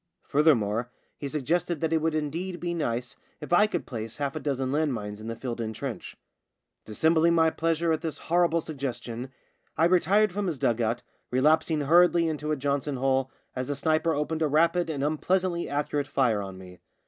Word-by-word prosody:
Furthermore 120 -6 +2 0.3
he 145 - -5
suggested 160 +4 -1
that 160 +1 0
it 160 - +3
would 160 0 0
indeed 170 +4 -3
be 175 0 -2
nice 125 -7 -3 0.2
if - - -5
I 210 +4 +6
could 215 - -3
place 115 -3 -6
half 140 -1 -2
a - - -2
dozen 135 -3 -2
land 150 -2 +1
mines 105 -1 -6
in 110 - -7
the 115 - -4
filled 120 -1 -5
in 110 -1 -3
trench. - - -6 0.7
Dissembling 160 +9 +3
my 160 -1 +4
pleasure 165 +1 0
at 160 - 0
this 160 -2 -4
horrible 170 -1 +2
suggestion, 130 -5 -5 0.5
I 165 - +4
retired 185 +4 +3
from 205 0 -2
his 165 -5 -2
dug 120 -2 +1
out, 115 +2 -1 0.3
re 125 - 0
lapsing 155 +2 +3
hurriedly 170 +3 +4
into 150 -1 -2
a - - +2
Johnson 140 +1 -1
hole 130 0 +1 0.3
as 130 +1 -3
a 145 - -1
sniper 160 +3 +1
opened 155 +2 -2
a 155 - +3
rapid 165 +4 +2
and 140 -3 -2
unpleasantly 170 +3 0
accurate 145 0 -1
fire 120 -7 +1
on 95 -1 -7
me. 90 -1 -12
150 Hz, 195 wpm, -27 LUFS, 130-165 Hz, 0.7 s, I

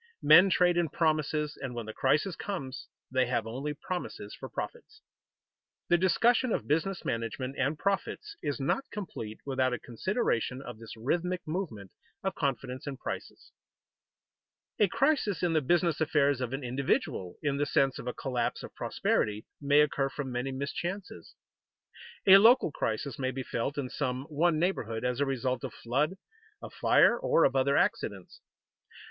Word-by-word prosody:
Men 190 +2 +8
trade 175 -1 +3
in 170 -2 +2
promises 155 -1 0
and 130 -3 -5
when 120 -2 -4
the 110 - -7
crisis 155 - +1
comes, 140 -10 -5 0.2
they 130 -1 +2
have 120 -3 0
only 135 +6 -4
promises 160 - -5
for - - -8
profits. - - -7 0.9
The 175 - +5
discussion 235 +7 +3
of - - -1
business 170 +5 0
management 115 +4 -3
and 140 +3 +1
profits 200 - -2
is 145 - -2
not 205 - -1
complete 130 - -6
without 130 -2 +1
a 125 - -2
consideration 125 - -1
of 120 -5 -9
this 115 0 -10
rhythmic 175 +9 -1
movement 155 - -4 0.3
of 195 - -1
confidence 130 -2 -3
and 140 -2 -4
prices. - - -7 1.3
A 210 - +5
crisis 265 - +1
in 175 -2 +2
the 155 - +3
business 170 +2 +1
affairs 145 -4 +2
of 125 -1 -2
an 135 +1 -4
individual, 125 -7 -1
in 140 -1 0
the 145 0 0
sense 135 -1 +2
of - - -7
a 125 - -2
collapse 125 -3 -2
of - - -9
prosperity, 105 0 -1 0.2
may 145 +1 +5
occur 140 -2 +1
from 135 -1 -5
many 125 +2 -2
mischances. 175 +8 -5 0.9
A 195 0 +10
local 225 - +6
crisis 115 +2 -3
may 130 -1 0
be 130 0 -4
felt 130 +4 -3
in 140 -3 -1
some 130 -1 -2
one 160 +2 +2
neighborhood 125 - -1
as 125 0 -1
a 145 - +1
result 130 -2 -1
of - - -4
flood, 145 +9 0 0.4
of - - -10
fire, 240 - +4
or 165 - +3
of - - +3
other 135 +1 +3
accidents. 475 - -1
140 Hz, 165 wpm, -30 LUFS, 125-175 Hz, 1.3 s, A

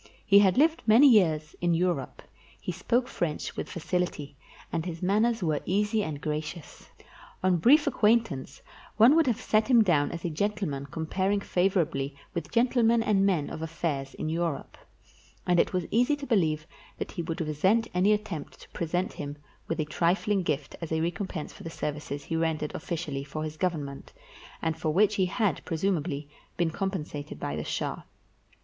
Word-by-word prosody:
He 200 0 +7
had 190 -3 +4
lived 320 +3 +4
many 235 +7 +8
years 160 - +3
in 175 -1 +2
Europe; 170 -6 -1 0.4
he - - -4
spoke 245 +1 0
French 160 -9 -3
with - - -4
facility, 170 -4 -3 0.4
and 165 - 0
his 170 0 -6
manners 215 +3 +2
were 155 -3 +1
easy 210 +3 +1
and 155 -5 -4
gracious. 150 +1 -5 0.5
On 185 -1 +3
brief 285 - +5
acquaintance, 210 - +1 0.3
one 235 +7 +7
would 325 -3 +4
have 240 -2 +1
set 215 -2 +2
him 240 -4 +6
down 155 -7 +2
as 170 0 -6
a 170 - -1
gentleman 155 -6 -2
comparing 185 +7 -1
favorably 175 -8 0 0.2
with 165 -3 -4
gentlemen 235 -1 +3
and 200 -3 +3
men 170 -7 +1
of - - -6
affairs 155 -4 -3
in 155 - -4
Europe; 165 -1 -2 0.7
and 175 -1 +3
it - - +3
was 180 -2 -1
easy 245 +6 +3
to 285 -1 -7
believe 160 - +1 0.3
that - - -5
he - - -4
would 165 -1 -4
resent 185 +9 +2
any 185 +3 +3
attempt 190 -8 -3
to - - -14
present 175 +2 -2
him 145 0 -6 0.3
with 165 - -2
a 155 - +1
trifling 185 +6 +1
gift 150 -5 -2
as 165 - -5
a 160 - +1
recompense 170 -1 -3
for - - -14
the 165 - -6
services 150 -2 -4
he 165 - -4
rendered 160 -2 -1
oflScially 150 -4 -4
for 150 +2 -5
his 155 0 -5
Government, 155 -5 -3 0.5
and 160 -1 -1
for 160 - -1
which 205 +5 +4
he 190 -2 +2
had, 195 - 0
presumably, 165 -4 -1 0.3
been 170 -2 +1
compensated 160 -6 -4
by 70 - -3
the 75 - -3
shah. - - -3
175 Hz, 175 wpm, -28 LUFS, 155-205 Hz, 0.7 s, many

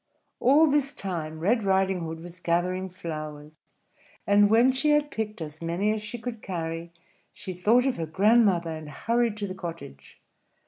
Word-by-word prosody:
All 285 +5 +5
this 285 -1 +1
time 165 -7 -5
Red 215 +7 +1
Riding 190 -1 +2
Hood 165 -1 -6
was 175 +1 -10
gathering 180 +2 -1
flowers; 155 -4 -7 0.7
and 205 0 +5
when 235 +4 +5
she 265 +4 0
had 295 0 +2
picked 215 -4 -4
as 155 0 -7
many 175 +6 0
as 215 - -4
she 215 +3 -5
could 230 -1 -6
carry, 165 -2 -5 0.4
she 185 - -7
thought 220 +8 +3
of 270 - 0
her 165 -1 -3
grandmother, 195 -2 +3
and 155 -1 -8
hurried 230 +7 0
to 205 - -2
the 185 - -5
cottage. 165 - -9
190 Hz, 170 wpm, -26 LUFS, 165-225 Hz, 0.7 s, All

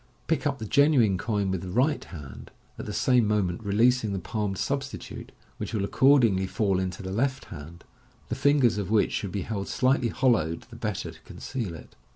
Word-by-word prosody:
Pick 160 -2 0
up 140 -1 -1
the 110 - -6
genuine 125 -7 +4
coin 100 -4 -1
with 95 -2 -2
the 95 - -6
right 135 +9 +1
hand, 75 -7 -10 0.3
at - - -6
the - - -3
same 125 -4 +3
moment 100 -4 0
releasing 110 +1 +2
the - - -1
palmed 100 +1 -3
substitute, 135 +3 -4 0.3
which - - -4
will 100 -2 0
accordingly 115 -7 +4
fall 95 -1 0
into 95 +1 -4
the 95 - -5
left 130 +6 -1
hand, 80 +4 -10 0.4
the - - -4
fingers 140 -6 +3
of 100 -2 -3
which 110 -1 +3
should 100 - -3
be 100 0 -3
held 100 -3 -4
slightly 130 -2 +2
hollowed, 110 -11 +1
the - - -10
better - - -3
to - - -17
con - - -13
ceal 115 -10 -4
it. 80 - -12
105 Hz, 195 wpm, -27 LUFS, 95-130 Hz, 0.4 s, genuine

